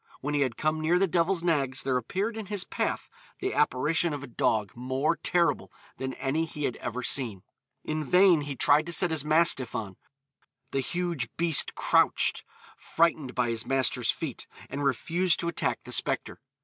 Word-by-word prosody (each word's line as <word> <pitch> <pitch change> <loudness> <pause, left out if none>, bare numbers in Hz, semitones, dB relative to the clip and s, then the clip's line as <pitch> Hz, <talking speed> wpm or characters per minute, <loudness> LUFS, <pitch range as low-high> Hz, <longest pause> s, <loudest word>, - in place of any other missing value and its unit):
When 145 +2 -4
he 145 - +1
had 130 -4 -1
come 155 0 -1
near 165 +3 +2
the 195 - +3
Devil's 170 0 +1
Nags 140 -6 +1
there 130 -1 0
appeared 190 - -2
in 220 -3 -6
his 205 -2 -1
path - - -3 0.3
the - - -3
apparition 155 +5 +1
of 145 -1 -6
a 125 - -11
dog 110 -3 0
more 130 +6 -1
terrible 170 0 0 0.3
than 130 0 -4
any 155 +5 -1
he 150 -2 -7
had 125 - -1
ever 125 +1 -5
seen. 115 -8 +1 0.4
In 155 0 -3
vain 180 +1 +4
he 145 -1 -5
tried 150 +5 +3
to 170 - -3
set 175 +1 +2
his 160 -3 0
mastiff 155 -5 +3
on; 105 -5 -5 0.7
the 135 - -1
huge 170 -1 -2
beast 165 -2 +4
crouched - - +2 0.3
frightened 160 -6 0
by 125 -1 +1
his 115 -1 -2
master's 135 -1 0
feet - - -3 0.2
and 145 - -3
refused 165 +6 +1
to 170 - -3
attack 170 - -1
the - - -10
spectre. - - -2
150 Hz, 180 wpm, -27 LUFS, 130-170 Hz, 0.7 s, vain